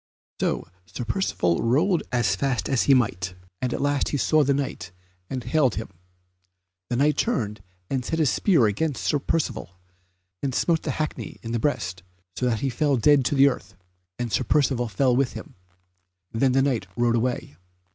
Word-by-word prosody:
So - - -1 0.2
Sir 120 - -6
Percivale 90 - 0
rode 160 - +2
as 115 -6 +2
fast 125 +5 -1
as 135 -4 +1
he 135 - +8
might, 95 -7 0 0.3
and 125 - -1
at - - -2
last 145 -1 +1
he 145 - -1
saw 155 +2 +3
that 140 0 +2
Knight, 135 -10 -4 0.4
and 130 -2 -4
he - - -8
hailed 145 -7 +3
him. 110 - -5 1.0
The - - 0
Knight 145 +3 +2
turned 105 - -1 0.3
and 130 +2 -2
set 160 - -2
his 155 -7 +3
spear 155 - +3
against 130 +7 -1
Sir 145 - +1
Percivale, 140 - -2 0.6
and 135 -2 -2
smote 165 -2 +2
the - - -4
hackney 155 -1 -4
in 115 - -5
the 120 - 0
breast, 90 -9 -1 0.3
so 125 - 0
that 115 -3 0
he 135 - 0
fell 140 +2 +1
dead 145 +3 +5
to 145 - +1
the 135 +1 +6
earth, 135 - -3 0.4
and 120 -2 -3
Sir - - +2
Percivale 135 -5 +1
fell 125 +4 +2
with 135 0 +1
him; 155 - -9 0.8
then 125 +3 +2
the 135 0 +4
Knight 125 -9 0
rode 120 -1 +2
away. 120 - -2
130 Hz, 185 wpm, -25 LUFS, 115-145 Hz, 1.0 s, he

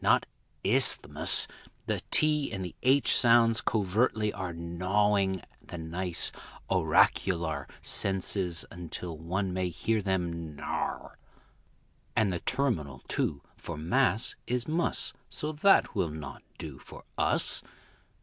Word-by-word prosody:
not - - +3 0.4
isthmus - - +4 0.4
The - - -2
t 150 -2 +3
and 95 -1 -4
the 90 - -7
h 135 +2 +5
sounds 115 -1 +5
covertly 105 +1 0
are 95 -3 -5
Gnawing 95 +3 0 0.2
the 85 - -9
nice 85 +1 -2 0.4
auracular 85 -4 +2 0.2
Senses 95 -2 +1
until 85 -1 -7
one 90 +4 -3
may 90 -1 -1
hear 110 +6 -1
them 85 -5 -3
gnar - - -4 1.0
And 100 -4 +2
the 85 - -2
terminal, 80 - -2
too, 70 -2 -2
for - - -8
m_a_s, 85 +6 +2
is 125 0 -1
m_u_s, 165 +3 +1 0.2
So 150 - -3
that 175 +6 +3
will 95 -7 0
not 75 -3 -8 0.2
do 75 -5 -8
for - - -13
us. - - +1
95 Hz, 120 wpm, -29 LUFS, 85-110 Hz, 1.0 s, h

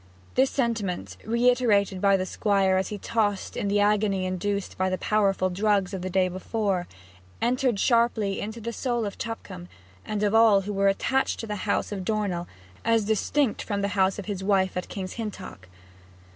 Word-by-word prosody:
This 265 +1 +3
sentiment, 225 -8 -2
reiterated 230 -5 +2
by 195 -1 +4
the 185 - -2
Squire 195 -1 +1
as 190 - 0
he 210 - -5
tossed 205 -2 -1
in - - -2
the 205 +1 +2
agony 205 -2 +2
induced 195 +2 -2
by 185 0 0
the 185 - -1
powerful 195 -3 +1
drugs 200 0 +1
of 190 - -4
the 185 - -3
day 185 0 +2
before, 190 0 -2 0.5
entered 245 -2 +1
sharply 230 -5 +2
into 220 +3 -5
the 230 +1 -5
soul 240 -2 -1
of 200 - -6
Tupcombe 225 - -6 0.4
and 210 -1 -3
of 205 0 +2
all 225 -3 +6
who 205 +2 -5
were 195 0 +2
attached 265 +7 +1
to - - -5
the 210 -1 -4
house - - 0
of 195 -2 -4
Dornell, 195 -4 -1 0.4
as 225 -2 +2
distinct 220 +4 +1
from 200 -2 -2
the 200 - +1
house 190 -1 +1
of 205 - -6
his 200 -3 -4
wife 190 -2 +2
at 180 - -4
King's 190 -2 -5
Hintock. 190 - -7
205 Hz, 185 wpm, -26 LUFS, 190-225 Hz, 0.5 s, all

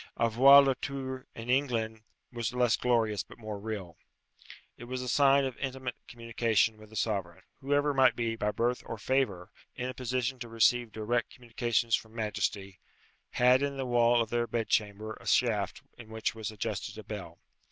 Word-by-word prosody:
Avoir 130 +5 +7
le 135 -1 +2
tour 130 0 -6
in 115 +1 -8
England 120 -4 0 0.3
was 120 +1 -3
less 125 -2 +3
glorious 115 -5 +1
but - - -13
more 110 -3 -6
real. 100 -5 -6 0.8
It 120 - -10
was 125 +1 -4
a - - -5
sign 140 +2 +4
of 130 -2 -4
intimate 130 -2 -4
communication 115 -2 0
with 110 0 -15
the 110 - -14
sovereign. 100 -6 -2 0.2
Whoever 145 +1 +1
might 130 -2 +4
be, 115 -1 -1
by 105 -2 -1
birth 120 +3 0
or 115 - -5
favour, 105 -7 -1 0.2
in 125 0 -3
a - - -5
position 130 0 -2
to 120 -1 -7
receive 115 +1 +2
direct 110 +3 -1
communications 120 -1 -1
from 110 0 -9
majesty, 100 -3 -3 0.5
had 125 +2 +4
in 140 -1 -2
the 135 - -2
wall 120 -1 +3
of 110 - -11
their 120 0 0
bedchamber 110 -1 -1
a - - -12
shaft 105 -6 +1 0.2
in 115 -2 -11
which 110 0 -2
was 110 -2 -5
adjusted 110 -2 -4
a - - -8
bell. - - -8
120 Hz, 175 wpm, -30 LUFS, 110-130 Hz, 0.8 s, Avoir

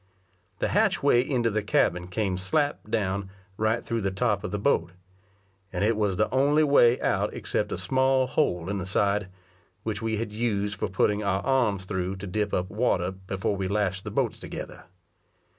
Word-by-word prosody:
The - - -1
hatchway 120 - +3
into 125 -3 0
the 110 +1 0
cabin 90 -3 +1
came 95 0 -1
slap 110 +7 -1
down, 100 -3 -1 0.3
right 110 +3 0
through 115 -1 -1
the 100 - 0
top 100 +1 0
of - - -3
the 105 - -2
boat; 90 -7 +1 0.8
and 90 +1 -1
it 110 +2 +3
was 105 -3 0
the 110 - +2
only 145 +4 +3
way 130 -4 +5
out - - +1
except - - -2
a - - -2
small 130 +7 +2
hole 90 - 0
in 100 0 -2
the 95 - -5
side, 100 +1 +1 0.6
which 105 -2 -3
we 110 -1 -1
had 110 -1 -4
used 105 -3 -1
for - - 0
putting 105 +2 +1
our 100 -1 0
arms 120 -8 +1
through 95 -1 -2
to 95 +1 -7
dip 105 +2 -1
up 90 0 0
water 95 -5 +1
before 95 +3 -3
we 95 -1 -2
lashed 95 -1 -1
the - - -5
boats - - -1
together. - - -8
105 Hz, 185 wpm, -26 LUFS, 95-115 Hz, 0.8 s, way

